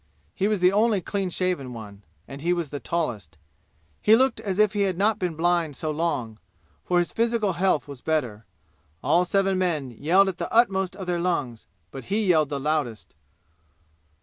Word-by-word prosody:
He 195 - 0
was 210 -3 0
the 180 0 +5
only 210 +1 +2
clean 195 +1 -3
shaven 175 -8 -2
one, 105 -3 -10 0.3
and 140 +1 -9
he 175 +3 +1
was 170 -5 -3
the 145 - -4
tallest. 115 - -3 0.6
He 215 - +6
looked 260 +3 +2
as 195 -3 -3
if 215 0 +3
he 205 - 0
had 190 -3 0
not 210 +3 +2
been 180 -3 -2
blind 170 -2 +1
so 155 +3 -3
long, 140 -9 -2 0.4
for 180 - 0
his 175 -1 +1
physical 230 -4 +1
health 175 -4 +1
was 140 -3 -10
better. 125 -9 -2 0.6
All 175 +2 +3
seven 195 0 +1
men 155 -8 -1
yelled 170 - +3
at 190 - -4
the - - -4
utmost 190 -5 +2
of 190 -1 -7
their 175 -1 -1
lungs, 145 -10 -2 0.2
but 135 - -8
he 210 +2 0
yelled 160 -6 +3
the 140 -2 -3
loudest. 145 -6 -2
175 Hz, 185 wpm, -25 LUFS, 145-195 Hz, 0.6 s, He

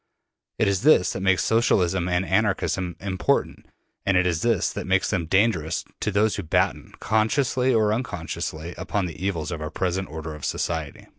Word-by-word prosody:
It - - +2
is 100 -1 +1
this 145 -11 +4
that 95 - -5
makes 95 -1 +3
Socialism 95 -6 +2
and 90 +1 +1
Anarchism 95 -3 0
important, 95 -1 -1 0.4
and 95 -1 +2
it 90 - +3
is 85 -3 0
this 115 -6 +1
that - - -5
makes 95 0 +2
them 85 -6 -1
dangerous 95 -4 +1
to - - -1
those 105 +1 +1
who - - -2
batten, 80 - 0
consciously 125 +4 +1
or 110 -3 +3
unconsciously 85 -7 -4
upon 95 +1 -1
the 85 0 -7
evils 85 -5 -2
of 80 -2 -5
our 75 - -3
present 95 +3 -2
order 80 0 -6
of 75 -2 -11
society. 80 -4 -3
95 Hz, 175 wpm, -24 LUFS, 85-105 Hz, 0.4 s, this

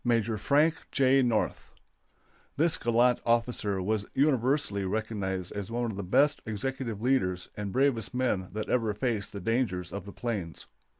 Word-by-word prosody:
MAJ. 115 -3 +1
FRANK 150 +8 +3 0.2
J. 135 0 +4
NORTH. 115 -4 -1 0.8
This 160 +2 +3
gallant 120 +1 +3
officer 115 -5 0
was 105 +1 0
universally 135 -6 +2
recognized 95 -3 -2
as 100 0 -5
one 120 0 -1
of - - -7
the 100 - -4
best 145 +11 +3
executive 115 0 -3
leaders 90 -9 +1
and 105 -1 -4
bravest 130 -3 +1
men 125 -8 0
that 110 0 -3
ever 115 -4 +1
faced 110 -3 -1
the 100 - -6
dangers 95 -4 -1
of 100 -1 -5
the 100 - -8
plains. 100 -9 -4
115 Hz, 155 wpm, -29 LUFS, 100-130 Hz, 0.8 s, J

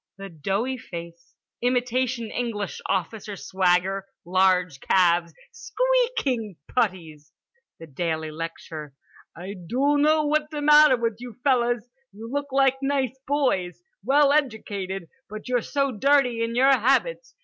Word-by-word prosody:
The 195 0 -8
doughy 195 - -2
face. 170 -3 -10 0.3
Imitation 245 -1 0
English 220 -5 -4
officer 200 +3 -3
swagger. 190 +1 0 0.2
Large 180 -4 +2
calves, 175 0 +2 0.2
squeaking 455 - -1
puttees. 165 -10 -2 0.5
The 165 - -9
daily 160 +1 -3
lecture: 155 -2 -7 0.4
"I 185 +4 -7
doughno 285 - +1
what's 300 0 +1
th'matter 300 -2 +5
with 230 -2 -1
you 245 -3 -9
fellers. 240 -4 +1 0.2
You 225 +4 -10
look 285 0 -3
like 270 0 +3
nice 270 -2 0
boys. 265 - 0 0.2
Well 280 +4 +4
edjucated. 205 - -2 0.2
But 215 0 -8
you're 250 -1 +1
so 275 +1 -1
dirty 250 0 +2
in 230 0 -3
your 265 +3 +5
habits. 275 - +1
230 Hz, 120 wpm, -24 LUFS, 185-275 Hz, 0.5 s, th'matter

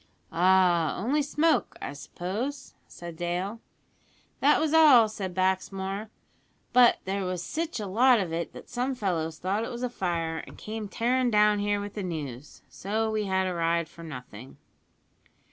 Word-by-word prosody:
"Ah! 175 -1 +3
only 265 +10 +1
smoke, 300 +2 +1
I - - -5
suppose," 195 - -5
said 170 -1 -9
Dale. 180 +6 -3 0.8
"That 290 +2 +4
was 315 -1 0
all," 290 -8 +7
said 190 -4 -6
Baxmore, 190 +2 -1 0.6
"but 245 -1 +6
there 195 +1 -2
was 180 -1 -3
sitch 315 - -3
a 210 - -3
lot 235 +5 +4
of 175 -5 -3
it 170 0 -3
that - - -11
some 255 +2 -2
fellows 165 -8 -2
thought 195 +4 -1
it - - -4
was 240 0 -6
a 250 - -2
fire, 165 -6 -2
an' - - -12
came 215 0 -6
tearin' 245 +4 +1
down 210 -1 +4
here 205 0 0
wi' 205 0 -4
the 205 +1 -6
news, 150 -7 -6
so 220 +3 -2
we 215 -1 -1
had 190 -1 +1
a 185 - -1
ride 170 -1 0
for 170 - -14
nothing." 125 -6 -10
195 Hz, 165 wpm, -27 LUFS, 175-235 Hz, 0.8 s, all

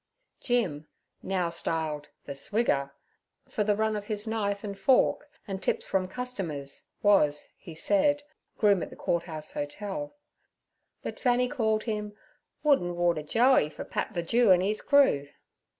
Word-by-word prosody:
Jim 180 - 0 0.3
(now 185 -2 0
styled 160 -3 -2
the - - -8
Swigger), 140 -2 0 0.6
for 220 -5 -1
the 210 0 +2
run 220 +1 +1
of 205 -1 -4
his 210 0 -2
knife 205 -3 -1
and 200 -2 -6
fork 275 +3 +3 0.2
and 195 -1 -4
tips - - 0
from 190 -1 0
customers, 185 - -5
was, 150 -8 +3
he 165 - -11
said, 290 - +2 0.3
groom 200 -4 +4
at - - -4
the - - -11
Court 170 -1 -1
House 155 -3 -7
Hotel; 210 - -5 0.9
but - - -5
Fanny 250 -1 +3
called 220 -5 0
him 210 -2 -3 0.5
'Wood 295 -2 +5
an' 175 0 -3
water 175 -2 +1
Joey 230 - +4
for - - -8
Pat 215 - -3
the 170 - -1
Jew 230 +4 +4
an' 180 0 +5
'ees 210 +2 0
crew.' 265 - +4
200 Hz, 155 wpm, -28 LUFS, 165-235 Hz, 0.9 s, Wood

